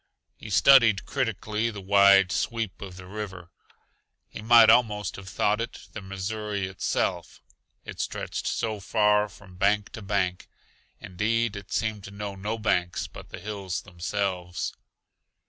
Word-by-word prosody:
He 110 - -10
studied 110 -2 +6
critically 115 -3 -1
the 105 -3 -7
wide 100 -1 +5
sweep 115 -2 -2
of 95 -3 -8
the 90 - -10
river. 95 -3 -7 0.8
He - - -8
might 115 0 +7
almost 105 -5 +2
have 95 -1 -9
thought 105 +2 +1
it 120 +2 -7
the 110 - -6
Missouri 100 +1 -4
itself, 95 -1 -2 0.5
it - - -9
stretched - - -3
so 110 -2 -2
far 105 0 +2
from 95 -1 -16
bank 100 +2 +1
to 110 - -8
bank; 95 -3 -1 0.5
indeed, 110 +4 -1
it 100 -1 -9
seemed 110 -2 -1
to - - -8
know 100 0 -6
no 105 +3 -4
banks 90 -5 0
but - - -11
the - - -8
hills 100 -2 -5
themselves. 90 -1 -3
100 Hz, 145 wpm, -26 LUFS, 95-110 Hz, 0.8 s, might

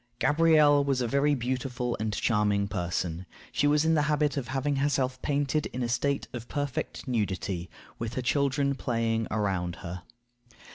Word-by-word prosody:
Gabrielle 150 -1 +5
was 135 -2 +1
a 120 - 0
very 140 +4 +2
beautiful 125 -1 -2
and 110 0 -1
charming 105 -3 +1
person. 90 -2 -3 0.2
She 145 - +2
was 150 +1 +3
in 160 - +4
the 155 - +3
habit 150 -1 +2
of 135 -4 -3
having 135 +2 -1
herself 135 -2 0
painted 145 +1 0
in 125 - -4
a - - 0
state 140 +4 0
of 120 -1 -6
perfect 145 -2 -3
nudity, 95 -6 -2 0.3
with 115 0 -4
her 130 - -2
children 140 +1 +1
playing 115 -3 -1
around 95 -5 -1
her. 90 +1 -5
130 Hz, 160 wpm, -28 LUFS, 110-145 Hz, 0.3 s, Gabrielle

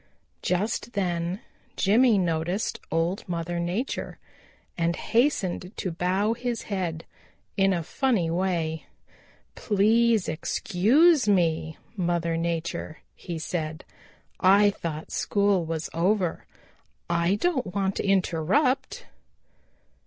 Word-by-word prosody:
Just 210 +6 -1
then 180 0 -1 0.4
Jimmy 225 +3 +4
noticed 175 +2 -1
Old 165 +4 0
Mother 170 0 -2
Nature 180 +10 -3 0.6
and 170 0 0
hastened 205 -7 0
to 185 - -2
bow 185 +6 0
his 240 0 -3
head 175 -5 -3 0.5
in 195 0 +3
a 175 -3 0
funny 190 - 0
way. 170 -3 -1 0.7
"Please 220 +1 +2
excuse 220 - +3
me, 160 -4 +1 0.2
Mother 170 -3 0
Nature," 165 -1 -3 0.2
he 170 -2 -6
said, 155 -1 -4 0.5
"I 200 +2 +5
thought 160 -5 -6
school 200 -4 +1
was 160 0 -3
over. 180 +1 0 0.6
I 170 +2 +2
don't 260 - -1
want 195 -1 0
to - - -1
interrupt." 255 - +1
185 Hz, 100 wpm, -26 LUFS, 170-210 Hz, 0.7 s, I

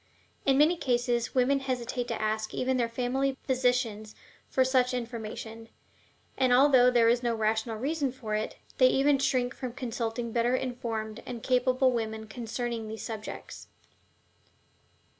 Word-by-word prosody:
In 270 -1 +5
many 310 +5 +4
cases 240 -4 0
women 265 +2 +3
hesitate 250 -2 -3
to 230 - -3
ask 215 0 -2
even 260 0 0
their 235 -2 0
family 260 +3 -1
physicians 245 -5 0 0.3
for 260 - +3
such 255 -1 +2
information, 225 -1 -6 0.7
and, 260 -1 +2
although 255 -1 +6
there 240 -2 +4
is 240 +1 +3
no 235 -2 0
rational 220 +1 0
reason 280 +2 -1
for 235 -4 -6
it, 215 0 -2 0.2
they 255 - +7
even 275 +2 +3
shrink 250 -2 +1
from 250 -2 -5
consulting 235 -2 -3
better 240 +2 +2
informed 230 -4 -4
and 240 -3 -6
capable 255 +1 +3
women 220 -2 -3
concerning 230 0 -4
these 220 0 -6
subjects. 220 -2 -7
245 Hz, 140 wpm, -29 LUFS, 225-255 Hz, 0.7 s, they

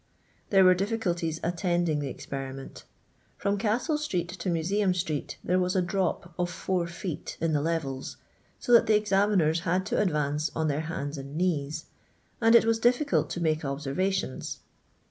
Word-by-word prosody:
There 195 -2 +6
were 185 0 +7
difficulties 180 -5 -1
attending 175 -2 0
the 145 - -2
experiment. 135 0 -7 0.5
From 200 0 0
Castle 245 +9 0
street 180 - -2
to 180 0 -4
Museum 180 +3 +1
street 160 -5 -3
there 180 +1 +2
was 180 +1 0
a 185 - +3
drop 180 -1 -1
of 175 0 +1
4 180 0 -1
feet 170 -1 -6
in 165 -1 0
the 145 - +2
levels, 145 -5 -3 0.4
so - - -4
that 235 - +7
the 215 - +5
examiners 195 -5 +3
had 185 +2 0
to - - +1
advance 150 -4 0
on 160 -1 0
their 145 +1 0
hands 145 -2 -4
and 140 +2 -8
knees, 155 -3 -1 0.6
and 225 0 +6
it 235 - +7
was 225 0 +2
difficult 250 +5 +2
to 175 - -4
make 155 -1 +1
observations. 145 +4 -2
175 Hz, 165 wpm, -28 LUFS, 155-195 Hz, 0.6 s, were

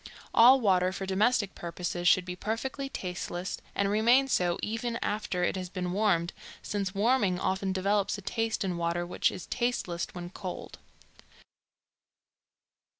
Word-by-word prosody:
All 255 +4 +8
water 185 -5 +3
for 190 +1 -5
domestic 205 +2 +2
purposes 175 0 -3
should 180 0 +5
be 180 -1 -5
perfectly 260 +8 -3
tasteless, 180 -3 -4 0.2
and 200 - +1
remain 235 +6 +4
so 175 -8 +1
even 230 +2 -2
after 205 -4 -1
it - - +1
has 185 -1 -4
been 180 -1 -3
warmed, 185 -4 +1 0.3
since 195 -2 -3
warming 205 -4 +2
often 190 +1 0
develops 195 +2 +1
a 200 - -10
taste 225 +2 -1
in 180 -3 -2
water 170 +1 -1
which 175 - +1
is 180 - -7
tasteless 240 -8 -1
when 175 0 -7
cold. 185 -2 -7
195 Hz, 145 wpm, -29 LUFS, 180-220 Hz, 0.3 s, All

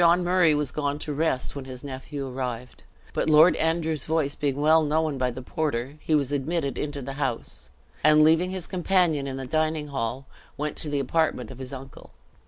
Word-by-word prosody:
Sir - - +6
John 175 +2 +5
Murray 175 -3 +4
was 145 -3 -1
gone 145 -1 -1
to 150 0 -4
rest 145 -3 0
when 140 -2 -6
his 130 -1 -8
nephew 135 +1 -6
arrived, 125 -1 -5 0.3
but - - 0
Lord 155 +3 +7
Andrew's 160 -2 0
voice 155 -3 +1
being 145 -2 -2
well 155 +2 +5
known 155 -2 0
by 125 0 +1
the 125 +1 -7
porter, 145 -1 -3
he 155 - +1
was 140 -2 +1
admitted 145 +1 -1
into 145 -2 -4
the 135 - -5
house; 125 -5 -3 0.3
and 155 +1 +6
leaving 165 +4 +4
his 185 -2 -4
companion 175 -6 +1
in 135 -1 -4
the 135 - -5
dining 155 +1 -1
hall, 135 0 -3 0.3
went 150 +1 -3
to 155 - -2
the 145 - -1
apartment 160 +2 0
of 130 - -11
his 130 0 -7
uncle. 135 -1 -10
145 Hz, 200 wpm, -26 LUFS, 135-160 Hz, 0.3 s, Lord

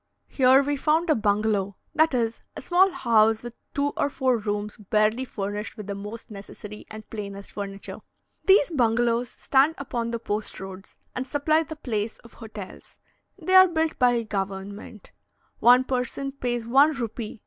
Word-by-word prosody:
Here 265 +1 +5
we 290 +1 -1
found 315 +4 +2
a - - +4
bungalow; 205 -2 0 0.2
that 315 -2 +3
is, 230 -2 -1 0.2
a - - -6
small 370 +2 +4
house 225 - +2
with 240 -1 -7 0.2
two 285 0 +1
or - - 0
four 260 -3 +1
rooms 210 0 -3
barely 215 +3 +1
furnished 205 -1 -5
with 210 - -7
the 200 - -4
most 210 +4 -8
necessary 210 +1 -10
and 215 0 -10
plainest 200 -2 -7
furniture. 200 -1 -7 0.5
These 380 -5 +5
bungalows 240 -3 +1
stand 280 +6 +2
upon 240 -4 -3
the 235 - -2
post 215 -1 -4
roads, 190 0 -10 0.2
and 255 +1 -3
supply 305 +3 +2
the 315 0 -7
place 225 -7 -3
of 230 - -16
hotels. 215 -4 -11 0.4
They 370 - -2
are 375 0 +9
built 320 -2 -1
by 245 -2 +3
government. 200 0 -6 0.5
One 245 +2 +6
person 260 +2 -3
pays 240 -4 -3
one 275 +6 +5
rupee 230 -4 -5
(2s.) - - -22
230 Hz, 165 wpm, -25 LUFS, 210-275 Hz, 0.5 s, are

